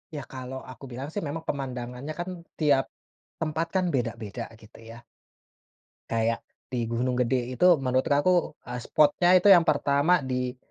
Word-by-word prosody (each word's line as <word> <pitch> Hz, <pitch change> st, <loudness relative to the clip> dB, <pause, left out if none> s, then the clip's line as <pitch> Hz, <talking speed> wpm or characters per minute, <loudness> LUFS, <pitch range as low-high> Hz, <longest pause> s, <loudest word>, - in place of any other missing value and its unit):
Ya 145 Hz, -, -4 dB
kalau 130 Hz, 0 st, -6 dB
aku 130 Hz, -, -14 dB
bilang 130 Hz, +4 st, -5 dB
sih 205 Hz, -, -3 dB
memang 160 Hz, +3 st, -5 dB
pemandangannya 130 Hz, +1 st, -4 dB
kan 175 Hz, -, -3 dB, 0.3 s
tiap 145 Hz, -3 st, +3 dB, 0.5 s
tempat 160 Hz, +1 st, -1 dB
kan 185 Hz, -1 st, +2 dB
beda-beda 115 Hz, -2 st, -3 dB, 0.2 s
gitu 110 Hz, +1 st, -16 dB
ya. 115 Hz, -, -10 dB, 1.1 s
Kayak 115 Hz, 0 st, +1 dB, 0.3 s
di 120 Hz, -2 st, -1 dB
Gunung 125 Hz, +2 st, -1 dB
Gede 125 Hz, 0 st, 0 dB
itu 150 Hz, -, +2 dB, 0.2 s
menurut 130 Hz, 0 st, +1 dB
kaku, 160 Hz, +3 st, +2 dB
eee, 125 Hz, 0 st, -4 dB
spotnya 155 Hz, +4 st, +3 dB
itu 185 Hz, -, +2 dB
yang 175 Hz, -3 st, +8 dB
pertama 145 Hz, +2 st, +3 dB
di 125 Hz, 0 st, -2 dB
130 Hz, 150 wpm, -27 LUFS, 125-155 Hz, 1.1 s, yang